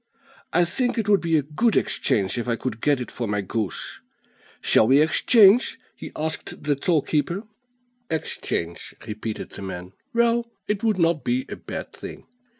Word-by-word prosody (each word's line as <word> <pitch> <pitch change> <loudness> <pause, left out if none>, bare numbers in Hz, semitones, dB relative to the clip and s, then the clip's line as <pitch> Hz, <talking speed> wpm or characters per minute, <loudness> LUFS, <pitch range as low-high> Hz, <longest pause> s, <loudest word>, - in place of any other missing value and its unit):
I 175 +1 +4
think 245 +8 -1
it 220 -3 0
would 205 -2 +4
be 165 -2 +2
a 150 - +1
good 200 - +1
exchange 100 +3 +1
if 120 - -4
I 120 - +1
could 115 -2 -4
get 145 -3 +3
it 125 - -5
for 120 - -3
my 105 0 0
goose. 100 -1 -4 0.6
Shall 110 - +4
we 135 +3 +6
exchange?" 200 - +5 0.2
he - - -8
asked 160 +1 -4
the 145 -1 +1
toll 155 +2 +1
keeper. 170 +6 -1 0.7
"Exchange," 85 - -3
repeated 110 0 -5
the - - -9
man; 90 -1 -6 0.2
"well, 235 -1 +2 0.2
it 210 0 -1
would 220 -3 +2
not 165 -3 +2
be 255 +2 0
a - - -4
bad - - -7
thing." - - -9
155 Hz, 170 wpm, -24 LUFS, -, 0.7 s, we